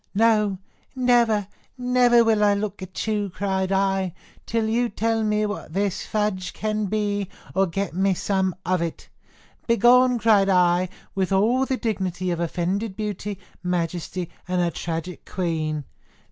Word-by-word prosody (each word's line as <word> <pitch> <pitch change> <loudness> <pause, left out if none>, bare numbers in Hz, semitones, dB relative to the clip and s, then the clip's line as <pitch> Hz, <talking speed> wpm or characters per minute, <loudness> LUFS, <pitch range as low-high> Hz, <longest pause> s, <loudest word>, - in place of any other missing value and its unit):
No, 210 -2 +3 0.4
never, 240 -5 +3 0.3
never 245 -1 +4
will 220 -2 +3
I 205 -1 +4
look 200 -1 -3
at 185 0 -5
you, 210 -2 -1
cried 190 0 -1
I, 195 -2 +1 0.3
till 225 -1 0
you 235 +2 +1
tell 225 +2 0
me 210 0 +1
what 205 -6 -5
this 200 -1 -1
fudge 200 -4 -1
can 215 -1 -1
be, 205 -1 -1 0.2
or 195 0 +2
get 195 +2 -3
me 190 +1 +2
some 190 -1 0
of 185 -1 +1
it. 170 -1 -5 0.6
Begone! 245 +1 +5
cried 210 -4 +4
I, 180 -1 +3 0.2
with 190 -1 -1
all 235 +7 +3
the 260 - 0
dignity 185 -6 -2
of 170 - -2
offended 185 +5 -2
beauty, 210 -1 -4 0.2
majesty, 175 0 -2 0.2
and 180 0 0
a 175 -1 +1
tragic 165 +2 -5
queen. 160 -4 -2
200 Hz, 145 wpm, -24 LUFS, 180-220 Hz, 0.6 s, Begone